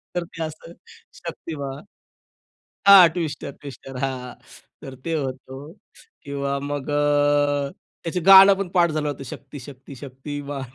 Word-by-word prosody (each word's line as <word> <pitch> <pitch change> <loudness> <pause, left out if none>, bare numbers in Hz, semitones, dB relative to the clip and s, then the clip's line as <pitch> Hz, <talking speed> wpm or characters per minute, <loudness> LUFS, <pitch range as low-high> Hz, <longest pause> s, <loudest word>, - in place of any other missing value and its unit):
तर 175 - -1
ते 165 -1 -7
असं 155 +1 -8 0.4
शक्तिमान. 140 -2 -7 1.0
हां, 195 -3 +10
ट्विस्टर 160 -4 -4
ट्विस्टर 135 -2 -10
हां. 125 -2 -4 0.5
तर 135 - -9
ते 165 -1 -2
होतं 135 +1 -6 0.5
किंवा 140 0 -3
मग 145 0 -4
अ, 145 -1 +2 0.3
त्याचे 175 +2 -2
गाणं 195 +2 +9
पण 195 -1 -4
पाठ 175 -2 +2
झालं 150 -1 -2
होतं. 145 - -5
शक्ती 140 +3 -10
शक्ती 135 +1 -12
शक्तीमान. 140 +2 -7
145 Hz, 130 wpm, -23 LUFS, 140-165 Hz, 1.0 s, हां